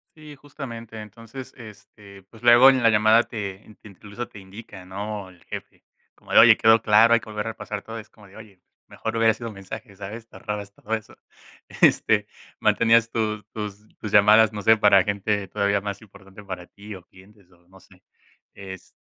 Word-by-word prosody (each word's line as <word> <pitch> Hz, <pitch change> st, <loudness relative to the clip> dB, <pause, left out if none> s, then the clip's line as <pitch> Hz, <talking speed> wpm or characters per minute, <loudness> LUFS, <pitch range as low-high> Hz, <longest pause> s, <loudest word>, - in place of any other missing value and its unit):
Sí, 150 Hz, -2 st, -13 dB
justamente, 115 Hz, -6 st, -10 dB
entonces, 115 Hz, +4 st, -11 dB
este, 100 Hz, -3 st, -15 dB
pues 110 Hz, +4 st, -19 dB
luego 120 Hz, +2 st, +7 dB
en 130 Hz, -2 st, 0 dB
la 115 Hz, -, +5 dB
llamada 110 Hz, +2 st, +4 dB
te 105 Hz, -1 st, -8 dB
te -, -, -14 dB
incluso 105 Hz, +4 st, -9 dB
te 100 Hz, -, -13 dB
indica, 95 Hz, 0 st, -12 dB
¿no? 100 Hz, +1 st, -6 dB
El 90 Hz, -2 st, -20 dB
jefe, -, -, -10 dB, 0.3 s
como -, -, -16 dB
de: -, -, +8 dB
"Oye, -, -, +8 dB
¿quedó 110 Hz, 0 st, +4 dB
claro? 115 Hz, +2 st, +5 dB
Hay 115 Hz, -, +4 dB
que 110 Hz, -, -14 dB
volver 105 Hz, 0 st, -4 dB
a -, -, -2 dB
repasar 105 Hz, -2 st, -7 dB
todo". 115 Hz, 0 st, -8 dB
Es 105 Hz, -, -13 dB
como 105 Hz, -, -20 dB
de: 95 Hz, -, -19 dB
"Oye, 105 Hz, -4 st, -14 dB
pues -, -, -57 dB
mejor 110 Hz, 0 st, -6 dB
hubiera 115 Hz, -1 st, +3 dB
sido 115 Hz, 0 st, -7 dB
un 105 Hz, -, -12 dB
mensaje", 100 Hz, +2 st, -10 dB
¿sabes? 110 Hz, +4 st, -9 dB
Te -, -, -20 dB
ahorrabas 105 Hz, -1 st, -6 dB
todo 110 Hz, +3 st, -7 dB
eso. 110 Hz, -, -10 dB, 0.7 s
Este 105 Hz, -2 st, +3 dB, 0.3 s
mantenías 115 Hz, 0 st, +3 dB
tus 105 Hz, -2 st, -2 dB
tus 105 Hz, 0 st, -7 dB
tus 105 Hz, -, -6 dB
llamadas, 105 Hz, +1 st, +6 dB
no 105 Hz, -, -5 dB
sé, 110 Hz, 0 st, +6 dB
para 100 Hz, -2 st, +5 dB
gente 100 Hz, 0 st, -2 dB
todavía 100 Hz, -1 st, 0 dB
más 100 Hz, +1 st, -6 dB
importante 100 Hz, -1 st, -16 dB
para 95 Hz, -3 st, -8 dB
ti, 100 Hz, +2 st, -11 dB
o 95 Hz, -, -13 dB
clientes, 95 Hz, 0 st, -21 dB
o 85 Hz, 0 st, -27 dB
no 95 Hz, +1 st, -19 dB
sé -, -, -23 dB, 0.5 s
es 95 Hz, -2 st, -11 dB
105 Hz, 200 wpm, -23 LUFS, 100-115 Hz, 0.7 s, de